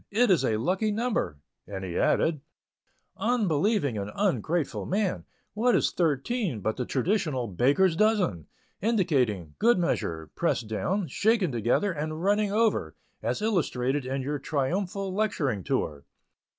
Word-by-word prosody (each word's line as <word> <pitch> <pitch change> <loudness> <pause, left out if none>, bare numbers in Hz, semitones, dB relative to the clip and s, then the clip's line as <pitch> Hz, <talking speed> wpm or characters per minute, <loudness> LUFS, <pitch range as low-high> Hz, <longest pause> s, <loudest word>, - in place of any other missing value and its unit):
It 235 +1 +3
is 170 -7 +4
a 110 -4 +1
lucky 185 - 0
number," 220 - -1 0.3
and 95 -2 -6
he 90 -2 -5
added: 155 -4 +2 0.8
"Unbelieving 200 - +1
and 100 0 -4
ungrateful 175 -6 0
man! 195 0 -1 0.3
What 235 +1 +2
is - - +2
thirteen 165 - 0
but 110 +3 -1
the 125 - -3
traditional 145 - 0
'baker's 140 - +3
dozen,' 190 - +1 0.3
indicating 135 - +1
'good 235 0 +4
measure, 80 - -2
pressed 115 - 0
down, 180 - -1
shaken 210 -5 +2
together, 120 - +1
and 155 +1 -4
running 205 +1 +2
over,' 210 - +1 0.3
as 120 - -2
illustrated 140 - 0
in 135 0 -2
your 145 +2 -2
triumphal 185 +8 -2
lecturing 150 - 0
tour? 70 -3 -2
165 Hz, 135 wpm, -27 LUFS, 125-205 Hz, 0.8 s, is